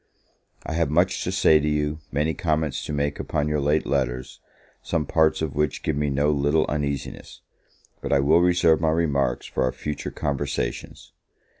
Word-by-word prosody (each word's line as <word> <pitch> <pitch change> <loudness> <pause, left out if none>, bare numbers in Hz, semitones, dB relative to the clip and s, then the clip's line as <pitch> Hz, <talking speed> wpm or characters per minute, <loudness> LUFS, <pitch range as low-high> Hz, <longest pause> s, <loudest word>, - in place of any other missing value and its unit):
I - - -4
have 80 -2 +1
much 85 +5 +1
to - - -1
say 80 - +4
to 75 - -2
you, 75 +1 -1
many 75 +3 0
comments 80 -4 -1
to - - -5
make 70 0 -1
upon 75 0 -1
your 75 0 0
late 75 +2 +1
letters, 65 -3 -2 0.4
some 80 -3 -1
parts 80 +2 +2
of 75 -4 -3
which 75 0 -1
give 80 - 0
me 75 0 0
no 70 +2 +1
little 75 +2 +2
uneasiness; 70 -2 -4 0.6
but - - -4
I 70 - +4
will 80 +5 +4
reserve 85 -2 +3
my 80 - +2
remarks 70 -6 0
for - - -3
our 65 -1 +2
future 75 +2 -5
conversations. 70 -1 -4
75 Hz, 175 wpm, -24 LUFS, 70-80 Hz, 0.6 s, say